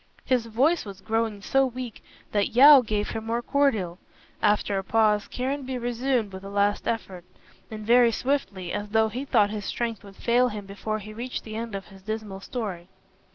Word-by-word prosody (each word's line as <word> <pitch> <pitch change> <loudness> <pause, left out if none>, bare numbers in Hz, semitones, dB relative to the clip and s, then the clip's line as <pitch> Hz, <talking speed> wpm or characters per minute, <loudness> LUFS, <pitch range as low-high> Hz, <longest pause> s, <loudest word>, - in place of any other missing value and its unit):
His 245 -3 +1
voice 275 +10 +2
was 200 -2 -9
growing 220 -1 -1
so 270 +4 +3
weak 255 -3 -5 0.3
that 205 -1 0
Yeo 280 +2 +10
gave 210 -3 -2
him 225 0 -5
more 235 +1 -1
cordial. 220 -13 +1 0.4
After 205 -1 +2
a - - -5
pause 210 0 +2
Caranby 260 0 -3
resumed 240 -3 -1
with 190 0 -8
a 195 - -7
last 205 0 +1
effort, 195 -6 -3 0.5
and 215 -1 -7
very 240 +1 +6
swiftly, 215 -9 -2
as 205 0 -3
though 220 +1 +3
he 255 +5 -5
thought 210 -6 +3
his 210 -2 -4
strength 230 -4 -3
would 200 -1 -13
fail 245 +4 +3
him 210 -2 -6
before 205 +2 -4
he 215 0 -9
reached 245 +3 -5
the 215 -1 -8
end 225 -2 -4
of 195 +1 -7
his 195 -1 -15
dismal 215 -1 -5
story. 195 -5 -5
220 Hz, 190 wpm, -26 LUFS, 205-245 Hz, 0.5 s, Yeo